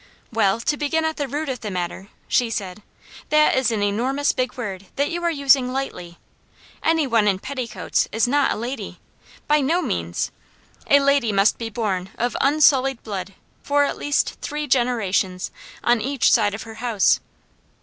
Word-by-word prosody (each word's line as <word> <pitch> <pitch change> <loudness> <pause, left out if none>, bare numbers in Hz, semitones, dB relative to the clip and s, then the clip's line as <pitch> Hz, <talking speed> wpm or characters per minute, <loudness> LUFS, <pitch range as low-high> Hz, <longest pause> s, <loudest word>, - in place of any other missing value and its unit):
"Well, 220 -1 +2
to 295 +5 0
begin 320 +2 0
at 315 0 -2
the 285 - -2
root 295 +4 -3
of 260 -3 -3
the 215 - -5
matter," 180 +1 -4 0.2
she 245 -2 +2
said, 200 -3 -4 0.5
"that 305 0 +4
is 260 -2 +2
an 220 -3 -1
enormous 255 +8 +1
big 255 0 -3
word 195 -5 -5
that 285 +1 0
you 345 0 -3
are 340 - +2
using 275 -4 +3
lightly. 180 -10 -5 0.6
Any 320 -1 +2
one 230 -5 +2
in 195 -2 +3
petticoats 255 +2 -2
is 225 +2 +1
not 285 +2 +2
a - - 0
lady 245 +5 -5 0.5
by 300 0 +3
no 320 +6 +2
means! 85 - -2 0.6
A 285 - +6
lady 275 -5 +2
must 195 +1 +3
be 230 -1 -4
born 195 -5 -2
of 245 +1 -1
unsullied 270 -3 +3
blood 195 -2 -5 0.3
for 285 0 +2
at 285 - -1
least 290 -1 -1
three 300 0 -3
generations, 220 -8 0 0.3
on 240 -1 +3
each 270 +1 +2
side 205 -1 +3
of 220 - -7
her 225 -1 -11
house. 230 -5 +3
245 Hz, 175 wpm, -22 LUFS, 205-285 Hz, 0.6 s, A